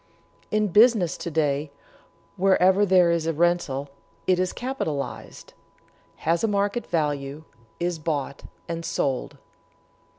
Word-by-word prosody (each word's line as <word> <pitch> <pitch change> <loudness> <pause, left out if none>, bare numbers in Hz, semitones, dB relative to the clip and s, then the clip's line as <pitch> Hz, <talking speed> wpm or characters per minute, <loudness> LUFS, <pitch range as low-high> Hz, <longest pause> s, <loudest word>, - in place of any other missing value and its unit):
In 215 -1 +1
business 210 -3 +4
to - - -5
day, 150 -2 0 0.7
wherever 190 +1 +4
there 180 -2 +5
is 165 -1 0
a 165 - +1
rental, 150 -4 0 0.3
it 185 -1 +2
is 185 0 0
capitalized, 155 - -5 0.7
has 170 +4 +1
a - - +3
market 205 +2 -1
value, 145 -2 -2 0.4
is 175 -1 -2
bought 145 -3 -3 0.3
and 170 0 -4
sold. 145 -4 -2
170 Hz, 120 wpm, -25 LUFS, 150-190 Hz, 0.7 s, there